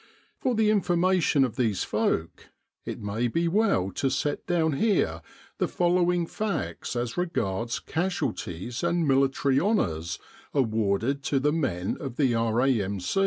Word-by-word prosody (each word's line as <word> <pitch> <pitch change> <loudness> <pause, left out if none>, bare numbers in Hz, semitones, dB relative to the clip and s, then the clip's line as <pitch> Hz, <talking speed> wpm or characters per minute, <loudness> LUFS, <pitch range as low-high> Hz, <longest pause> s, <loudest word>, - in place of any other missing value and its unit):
For 250 - 0
the 215 -1 +3
information 180 -6 +3
of 120 - -6
these 110 -6 +1
folk, 80 - -1 0.4
it - - -5
may 105 +4 -1
be 165 +8 0
well 175 - +2
to 135 +8 0
set 145 +2 -2
down 165 -3 +2
here 135 - +1 0.4
the - - +2
follow 175 0 +2
ing 175 -1 0
facts 210 -7 -3
as 120 -1 -2
regards 115 - -1
casualties 120 - -3
and 170 -2 +1
Military 135 0 +3
Honours 90 - 0 0.4
awarded 115 +1 +1
to 140 - +1
the 150 +2 +1
men 95 - -1
of 135 -4 -5
the 130 -4 +2
R.A.M. 115 -3 +1
135 Hz, 140 wpm, -27 LUFS, 110-175 Hz, 0.4 s, the